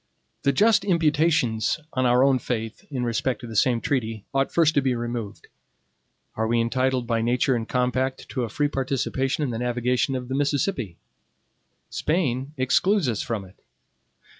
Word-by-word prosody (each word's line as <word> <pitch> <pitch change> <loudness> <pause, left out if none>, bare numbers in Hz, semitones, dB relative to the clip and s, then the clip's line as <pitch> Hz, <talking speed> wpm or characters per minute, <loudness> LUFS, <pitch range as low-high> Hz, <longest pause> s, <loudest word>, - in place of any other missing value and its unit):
The 140 - +3
just 210 +8 +4
imputations 155 - +2
on 130 -1 +1
our 125 +1 +4
own 135 -2 +4
faith, 115 -2 -4
in 130 -4 -3
respect 120 +2 -1
to - - -7
the 110 - -8
same 120 +2 +3
treaty, 115 -5 -2
ought 135 0 +1
first 160 -2 +3
to 140 - +3
be 130 -2 +1
removed. 120 -3 -5 0.9
Are 110 0 -1
we 120 +1 +2
entitled 130 +2 0
by 115 -1 0
nature 125 +3 +2
and 115 -1 -4
compact 130 +1 -1
to 130 - -3
a 120 - -2
free 145 +6 0
participation 135 0 -1
in 135 - -1
the 115 - -3
navigation 125 +2 0
of 125 -1 -4
the 130 - -4
Mississippi? 140 - -1 0.9
Spain 145 -4 -1
excludes 175 +7 +2
us 115 -4 -1
from 110 -4 -3
it. 95 - -18
130 Hz, 165 wpm, -24 LUFS, 120-140 Hz, 0.9 s, just